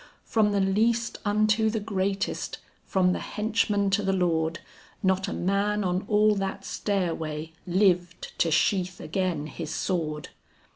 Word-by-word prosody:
From 215 -2 +2
the 200 - +1
least 225 +4 +1
unto 215 +1 +3
the 220 0 -1
greatest, 195 -1 -2 0.3
from 180 -1 +2
the - - -2
henchman 210 -2 0
to 200 +2 +2
the 195 -1 0
lord, 170 -3 +1 0.4
Not 190 0 +2
a - - -3
man 200 +3 0
on 185 +1 -1
all 210 0 +4
that 195 0 -3
stairway 165 -5 -2 0.2
lived 180 -2 +1
to 165 - +3
sheath 180 +3 +1
again 180 -6 -2
his 155 +1 -6
sword. 155 -5 -2
195 Hz, 140 wpm, -27 LUFS, 175-210 Hz, 0.4 s, all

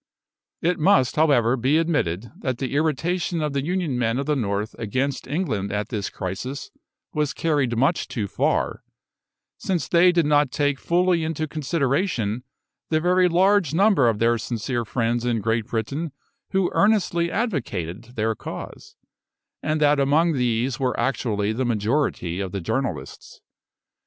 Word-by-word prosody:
It 175 +1 +1
must, 155 -6 +3
however, 135 -6 +3
be 135 +5 +2
admitted 120 - 0
that 130 - -2
the 130 0 -3
irritation 165 +4 0
of 150 -2 -2
the 140 -1 -1
Union 170 -6 -1
men 115 0 +1
of 140 - -2
the 150 0 +1
North 105 -3 -2
against 130 +5 -2
England 130 - -2
at 105 +1 -2
this 105 -5 -3
crisis 115 +9 -5 0.4
was 150 -2 -1
carried 145 -7 0
much 140 +8 +1
too 110 -4 -3
far, - - 0 0.8
since 180 -6 -1
they 180 +1 +5
did 170 -3 +2
not 145 -2 +3
take 145 0 0
fully 175 -1 +2
into 160 -1 -2
consideration 140 - -1 0.5
the 155 - +2
very 180 +2 +3
large 180 -2 +3
number 190 - +4
of 110 - 0
their 115 +1 +2
sincere 120 +1 -3
friends 120 +1 -1
in 120 -2 0
Great 115 +1 0
Britain 135 +7 -3 0.4
who 190 -2 +1
earnestly 190 -5 +2
advocated 120 - -3
their 110 0 0
cause, - - -9 0.7
and 155 0 -1
that 145 -1 +4
among 155 +5 +3
these 125 0 0
were 130 -2 0
actually 110 -5 0
the 130 +4 -1
majority 110 - 0
of 95 -2 -3
the 100 - -3
journalists. 85 - -4
135 Hz, 150 wpm, -23 LUFS, 115-165 Hz, 0.8 s, they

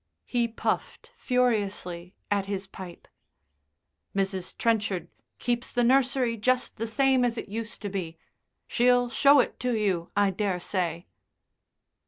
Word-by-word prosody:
He 240 -2 +1
puffed 465 - -3
furiously 205 -8 -1 0.2
at 200 -1 +1
his 195 -1 -3
pipe. 190 -2 -10 1.1
"Mrs. 190 -2 -2
Trenchard 210 -5 0 0.3
keeps 240 0 -1
the 245 - +1
nursery 250 -1 +3
just 255 +4 0
the 230 +1 -2
same 260 +3 +3
as 240 -1 0
it - - -5
used 225 +1 -6
to 205 - -2
be. 175 -4 -4 0.5
She'll 245 0 +3
show 280 +2 +6
it - - 0
to 250 -1 0
you, 185 -5 0
I 200 -1 +4
daresay." 180 -3 -2
220 Hz, 130 wpm, -27 LUFS, 195-245 Hz, 1.1 s, show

